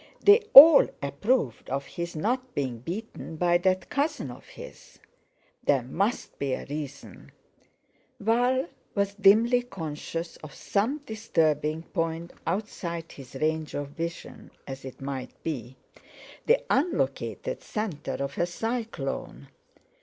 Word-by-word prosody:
They 415 Hz, +3 st, +7 dB
all 300 Hz, +2 st, +12 dB, 0.2 s
approved 140 Hz, -, -1 dB
of 140 Hz, +1 st, -2 dB
his 170 Hz, +2 st, -6 dB
not 250 Hz, +10 st, -2 dB
being 130 Hz, -5 st, -2 dB
beaten 175 Hz, -, -6 dB
by 175 Hz, +1 st, +3 dB
that 185 Hz, +1 st, 0 dB
cousin 285 Hz, -, -1 dB
of 120 Hz, -, -13 dB
his. -, -, -12 dB, 0.7 s
There 135 Hz, -4 st, +2 dB
must 195 Hz, -, -2 dB
be 140 Hz, -2 st, -1 dB
a -, -, -4 dB
reason! 145 Hz, -1 st, -8 dB, 0.9 s
Val 245 Hz, +5 st, +2 dB, 0.3 s
was 200 Hz, -1 st, 0 dB
dimly 220 Hz, +5 st, +5 dB
conscious 165 Hz, -5 st, -6 dB
of 155 Hz, -2 st, -11 dB
some 235 Hz, +9 st, -1 dB
disturbing 160 Hz, -8 st, 0 dB
point 165 Hz, 0 st, -3 dB
outside 170 Hz, -3 st, -3 dB
his 135 Hz, -2 st, -12 dB
range 155 Hz, +2 st, -1 dB
of 145 Hz, -1 st, -3 dB
vision; 165 Hz, +3 st, -7 dB, 0.2 s
as 135 Hz, -1 st, -8 dB
it 130 Hz, -, -9 dB
might 135 Hz, -2 st, -5 dB
be, 130 Hz, -5 st, -5 dB, 0.7 s
the -, -, +4 dB
unlocated 360 Hz, -, -1 dB
centre 200 Hz, -9 st, -4 dB
of 140 Hz, +3 st, -5 dB
a 175 Hz, -, +2 dB
cyclone. 175 Hz, -, -4 dB
170 Hz, 125 wpm, -27 LUFS, 145-225 Hz, 0.9 s, all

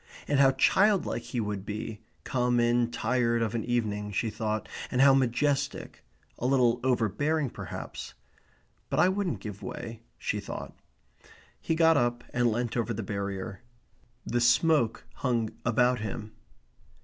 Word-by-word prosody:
And 145 Hz, -1 st, +2 dB
how 135 Hz, -1 st, +7 dB
childlike 195 Hz, +9 st, +3 dB
he 125 Hz, -, -4 dB
would 105 Hz, -3 st, -2 dB
be, 105 Hz, +1 st, -5 dB, 0.2 s
come 125 Hz, -1 st, +1 dB
in 120 Hz, 0 st, +3 dB
tired 120 Hz, 0 st, +1 dB
of 110 Hz, -, -2 dB
an 115 Hz, -, -1 dB
evening, 105 Hz, -4 st, -1 dB
she 110 Hz, +2 st, -1 dB
thought, 110 Hz, 0 st, -2 dB, 0.2 s
and 125 Hz, -, -1 dB
how 135 Hz, 0 st, +7 dB
majestic; 135 Hz, +2 st, 0 dB, 0.4 s
a 125 Hz, -, 0 dB
little 125 Hz, -3 st, +3 dB
overbearing 130 Hz, +4 st, +1 dB
perhaps; -, -, -7 dB, 0.7 s
"But -, -, 0 dB
I 180 Hz, -, +6 dB
wouldn't 190 Hz, -2 st, -1 dB
give 105 Hz, -2 st, -7 dB
way," 115 Hz, -1 st, -7 dB, 0.2 s
she -, -, -2 dB
thought. -, -, -7 dB, 0.8 s
He 165 Hz, -, -1 dB
got 165 Hz, -1 st, +5 dB
up 120 Hz, -1 st, 0 dB
and 120 Hz, -1 st, +2 dB
leant 120 Hz, +1 st, -2 dB
over 120 Hz, -1 st, -1 dB
the 110 Hz, -, -3 dB
barrier. 100 Hz, +1 st, -4 dB, 0.6 s
The 120 Hz, +1 st, 0 dB
smoke 120 Hz, 0 st, +3 dB
hung 120 Hz, -4 st, 0 dB
about 125 Hz, +1 st, +3 dB
him. 110 Hz, 0 st, -5 dB
120 Hz, 145 wpm, -28 LUFS, 110-130 Hz, 0.8 s, how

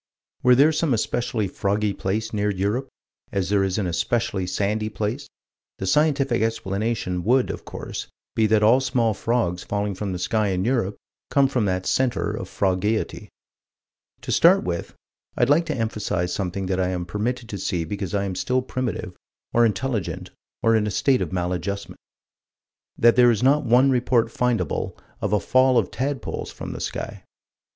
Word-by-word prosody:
Were 125 Hz, 0 st, +6 dB
there 145 Hz, +5 st, +6 dB
some 155 Hz, -4 st, +1 dB
especially 115 Hz, -1 st, -1 dB
froggy 100 Hz, +2 st, -1 dB
place 110 Hz, +4 st, -2 dB
near 105 Hz, 0 st, +1 dB
Europe, 105 Hz, +7 st, -1 dB, 0.4 s
as 95 Hz, -3 st, -1 dB
there 100 Hz, -1 st, +3 dB
is 95 Hz, -1 st, -1 dB
an 105 Hz, -, 0 dB
especially 95 Hz, +3 st, -1 dB
sandy 105 Hz, +4 st, -1 dB
place, 110 Hz, +7 st, -3 dB, 0.5 s
the 95 Hz, -, -4 dB
scientific 140 Hz, 0 st, +2 dB
explanation 105 Hz, -4 st, -1 dB
would 125 Hz, +5 st, +3 dB
of -, -, -8 dB
course -, -, -6 dB, 0.3 s
be 110 Hz, -1 st, +3 dB
that 105 Hz, 0 st, +3 dB
all 115 Hz, +5 st, +6 dB
small 125 Hz, -4 st, +1 dB
frogs 95 Hz, -5 st, -1 dB
falling 100 Hz, 0 st, -2 dB
from 100 Hz, +1 st, -4 dB
the 90 Hz, -, -3 dB
sky 105 Hz, +4 st, 0 dB
in 95 Hz, 0 st, -1 dB
Europe 115 Hz, -5 st, 0 dB, 0.3 s
come 140 Hz, -1 st, +4 dB
from 125 Hz, -5 st, 0 dB
that 95 Hz, -1 st, -1 dB
center 130 Hz, -2 st, +1 dB
of -, -, -5 dB
frogeity. 100 Hz, +3 st, -1 dB, 0.9 s
To -, -, -5 dB
start -, -, +5 dB
with, 85 Hz, -1 st, -4 dB, 0.4 s
I'd 120 Hz, +3 st, +3 dB
like 165 Hz, +3 st, +3 dB
to 155 Hz, -, -1 dB
emphasize 105 Hz, -6 st, -1 dB
something 95 Hz, 0 st, -2 dB
that 95 Hz, 0 st, -1 dB
I 90 Hz, -, +2 dB
am 90 Hz, -1 st, -2 dB
permitted 115 Hz, +6 st, -3 dB
to 100 Hz, -, -5 dB
see 90 Hz, -3 st, -1 dB
because 100 Hz, +1 st, -4 dB
I 100 Hz, -, +1 dB
am 95 Hz, -1 st, -3 dB
still 125 Hz, +7 st, 0 dB
primitive 130 Hz, -2 st, -3 dB, 0.4 s
or 120 Hz, 0 st, +5 dB
intelligent 110 Hz, -1 st, -3 dB, 0.3 s
or 115 Hz, 0 st, +4 dB
in 105 Hz, -1 st, +2 dB
a -, -, 0 dB
state 130 Hz, +6 st, +2 dB
of -, -, -2 dB
maladjustment: 90 Hz, +2 st, -3 dB, 1.0 s
That 120 Hz, 0 st, +5 dB
there 120 Hz, 0 st, +6 dB
is 115 Hz, -1 st, +1 dB
not 140 Hz, +3 st, +4 dB
one 125 Hz, +4 st, +5 dB
report 120 Hz, -2 st, +2 dB
findable 125 Hz, 0 st, -1 dB, 0.2 s
of -, -, -1 dB
a 105 Hz, -, +3 dB
fall 130 Hz, +6 st, +3 dB
of 110 Hz, -6 st, +1 dB
tadpoles 135 Hz, -1 st, -3 dB
from -, -, -7 dB
the -, -, -7 dB
sky. -, -, -5 dB
110 Hz, 175 wpm, -23 LUFS, 95-125 Hz, 1.0 s, Were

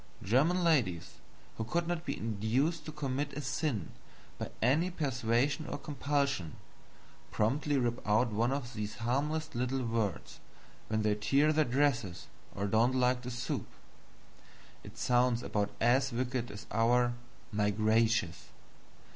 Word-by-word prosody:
German 155 Hz, -, +3 dB
ladies 120 Hz, -, +1 dB, 0.4 s
who 115 Hz, -, -2 dB
could 170 Hz, +10 st, -1 dB
not 175 Hz, -1 st, -2 dB
be -, -, -2 dB
induced 120 Hz, +9 st, 0 dB
to 155 Hz, -, -5 dB
commit 140 Hz, -1 st, -3 dB
a 150 Hz, -, -4 dB
sin 130 Hz, -, -2 dB, 0.5 s
by -, -, -4 dB
any 150 Hz, +10 st, +3 dB
persuasion 135 Hz, -1 st, 0 dB
or -, -, -3 dB
compulsion, 140 Hz, -, -1 dB, 0.7 s
promptly 140 Hz, +7 st, +1 dB
rip 120 Hz, -1 st, 0 dB
out 110 Hz, +3 st, +3 dB
one 115 Hz, +4 st, +1 dB
of 135 Hz, -3 st, -3 dB
these 105 Hz, -1 st, -4 dB
harmless 150 Hz, +7 st, -1 dB
little 125 Hz, +1 st, -1 dB
words 115 Hz, -5 st, -2 dB, 0.5 s
when 110 Hz, 0 st, 0 dB
they 105 Hz, -1 st, +3 dB
tear 135 Hz, +9 st, +3 dB
their 155 Hz, 0 st, +3 dB
dresses 120 Hz, -9 st, 0 dB, 0.3 s
or 100 Hz, -, -2 dB
don't 115 Hz, +5 st, +3 dB
like 125 Hz, 0 st, +2 dB
the 125 Hz, -, -6 dB
soup. 125 Hz, 0 st, -3 dB, 1.2 s
It -, -, -12 dB
sounds 125 Hz, -1 st, +2 dB
about 105 Hz, -3 st, -1 dB
as 130 Hz, +3 st, +3 dB
wicked 125 Hz, 0 st, -2 dB
as 105 Hz, 0 st, -9 dB
our 120 Hz, +2 st, +3 dB, 0.4 s
"My 105 Hz, -1 st, +1 dB
gracious." 110 Hz, -3 st, +1 dB
125 Hz, 140 wpm, -32 LUFS, 110-140 Hz, 1.2 s, German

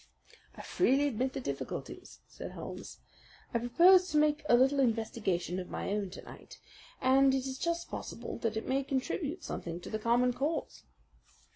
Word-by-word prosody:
"I -, -, -9 dB
freely 285 Hz, -4 st, +2 dB
admit 260 Hz, 0 st, -1 dB
the 275 Hz, -, -3 dB
difficulties," 255 Hz, -, -6 dB
said -, -, -8 dB
Holmes. -, -, -8 dB, 0.6 s
"I 235 Hz, -, +2 dB
propose 360 Hz, +10 st, +5 dB
to 300 Hz, -, +1 dB
make 300 Hz, 0 st, +3 dB
a 240 Hz, -, +7 dB
little 270 Hz, +3 st, +3 dB
investigation 220 Hz, -7 st, 0 dB
of 180 Hz, -, -7 dB
my -, -, -4 dB
own 205 Hz, -2 st, -1 dB
to 180 Hz, -, -10 dB
night, -, -, -12 dB, 0.4 s
and 270 Hz, +1 st, +4 dB
it 265 Hz, -1 st, -1 dB
is 265 Hz, -1 st, -5 dB
just 340 Hz, 0 st, -1 dB
possible -, -, -6 dB
that 225 Hz, -2 st, -1 dB
it 220 Hz, -, -4 dB
may 270 Hz, +1 st, +1 dB
contribute 290 Hz, +5 st, -2 dB
something 170 Hz, 0 st, -5 dB
to -, -, -9 dB
the 215 Hz, -, -2 dB
common 240 Hz, +3 st, +2 dB
cause." 290 Hz, +6 st, -3 dB
260 Hz, 170 wpm, -31 LUFS, 225-290 Hz, 0.6 s, a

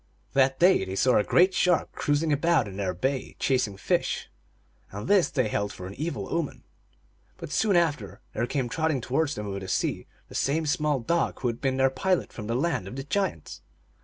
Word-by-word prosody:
That 135 Hz, -1 st, +3 dB
day 180 Hz, -, +5 dB
they 95 Hz, 0 st, -5 dB
saw 125 Hz, +5 st, +4 dB
a -, -, +2 dB
great 185 Hz, -, +4 dB
shark 180 Hz, -2 st, +2 dB
cruising 145 Hz, +1 st, 0 dB
about 150 Hz, -4 st, +2 dB
in 95 Hz, -, -8 dB
their 95 Hz, -2 st, -1 dB
bay, 130 Hz, +8 st, -2 dB
chasing 125 Hz, -7 st, 0 dB
fish, -, -, -1 dB, 0.6 s
and 105 Hz, +4 st, -7 dB
this 200 Hz, -4 st, +4 dB
they 130 Hz, -5 st, 0 dB
held 105 Hz, -1 st, -1 dB
for 90 Hz, -, -9 dB
an 95 Hz, -, -7 dB
evil 155 Hz, +9 st, -4 dB
omen. 165 Hz, -4 st, -3 dB, 0.7 s
But, -, -, -8 dB
soon 210 Hz, -3 st, +2 dB
after, 145 Hz, -, 0 dB
there 120 Hz, +2 st, -1 dB
came 130 Hz, -1 st, -1 dB
trotting 155 Hz, +1 st, 0 dB
towards 145 Hz, +5 st, 0 dB
them 105 Hz, -, -5 dB
over 100 Hz, -1 st, -4 dB
the 95 Hz, -, -8 dB
sea -, -, -1 dB, 0.2 s
the -, -, -14 dB
same 155 Hz, +4 st, 0 dB
small 150 Hz, -2 st, +1 dB
dog 170 Hz, +8 st, 0 dB
who 125 Hz, -, +1 dB
had 115 Hz, -, -5 dB
been 130 Hz, -1 st, 0 dB
their 135 Hz, 0 st, +3 dB
pilot 185 Hz, +5 st, 0 dB
from 105 Hz, -2 st, -7 dB
the 115 Hz, -, -1 dB
Land 135 Hz, -, 0 dB
of 100 Hz, -, -7 dB
the 135 Hz, -, -4 dB
Giants. 145 Hz, -, -2 dB
135 Hz, 205 wpm, -27 LUFS, 110-160 Hz, 0.7 s, day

